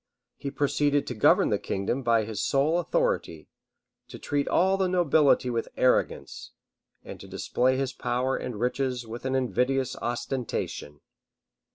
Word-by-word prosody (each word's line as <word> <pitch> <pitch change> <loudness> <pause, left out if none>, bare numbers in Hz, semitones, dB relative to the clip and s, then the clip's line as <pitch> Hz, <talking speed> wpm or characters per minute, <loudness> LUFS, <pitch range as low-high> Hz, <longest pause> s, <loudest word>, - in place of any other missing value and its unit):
[] - - -61
He 140 - -2
proceeded 145 0 +1
to - - -4
govern 110 - +4
the - - +1
kingdom 100 +7 -2
by 115 -3 +2
his 110 -2 -4
sole 150 +5 +2
authority; - - -1 0.6
to - - -10
treat 145 -1 -2
all 190 +2 +3
the 190 -1 +1
nobility 155 -7 +3
with 115 -1 -2
arrogance; 130 - 0 0.5
and - - -9
to - - -11
display 130 +1 0
his 135 0 -2
power 125 +2 -1
and 115 -5 -5
riches 125 0 -1
with 115 +3 -8
an 130 0 0
invidious 130 0 0
ostentation. 120 - -4
130 Hz, 150 wpm, -27 LUFS, 120-145 Hz, 0.6 s, govern